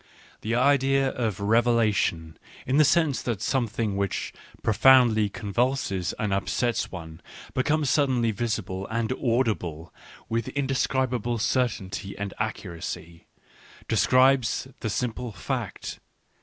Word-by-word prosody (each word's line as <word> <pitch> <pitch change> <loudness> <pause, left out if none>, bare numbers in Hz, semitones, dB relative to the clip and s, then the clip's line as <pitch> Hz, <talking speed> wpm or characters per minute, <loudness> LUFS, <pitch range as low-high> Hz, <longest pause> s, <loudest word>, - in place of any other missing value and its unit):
The 115 +2 -1
idea 135 +1 +3
of 110 -7 -2
revelation, 105 -7 +1 0.3
in 130 +3 +1
the 155 - +7
sense 150 -2 +2
that 115 -5 -2
something 115 -3 -1
which 100 -1 -2 0.3
profoundly 110 -2 +5
convulses 100 -3 -1
and 105 -2 -1
upsets 115 +4 -1
one 80 -2 -9 0.3
becomes 150 +2 +1
suddenly 130 -6 +2
visible 100 -4 -3
and 115 +1 -2
audible 100 - -1 0.3
with 115 0 -2
inde 135 -1 0
scribable 125 -3 0
certainty 100 -6 -1
and 100 0 -4
accuracy 85 -5 -5 0.3
— - - -23
describes 130 +3 +3
the 110 - -3
simple 120 +1 -3
fact. - - -5
115 Hz, 115 wpm, -26 LUFS, 100-130 Hz, 0.3 s, the